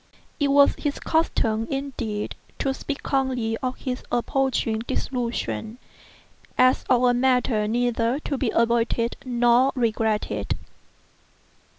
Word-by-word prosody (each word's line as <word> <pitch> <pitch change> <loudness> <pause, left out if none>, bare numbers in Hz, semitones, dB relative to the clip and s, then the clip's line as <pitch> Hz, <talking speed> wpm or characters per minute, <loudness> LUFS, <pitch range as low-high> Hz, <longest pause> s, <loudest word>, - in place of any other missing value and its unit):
It 285 - +2
was 280 0 +5
his 290 -1 -2
custom, 225 -9 0
indeed, 250 -7 -3 0.2
to 270 - 0
speak 280 +1 -5
calmly 255 -5 0
of 255 +1 -3
his 255 -1 -4
approaching 240 -2 0
dissolution, 235 - -3 0.8
as 255 +1 +4
of 250 -1 +4
a 245 -1 +5
matter 250 -3 +2
neither 240 +2 +1
to 285 - -3
be 260 -3 0
avoided 235 0 +1
nor 245 +1 +3
regretted. 220 -3 0
245 Hz, 110 wpm, -24 LUFS, 230-265 Hz, 0.8 s, was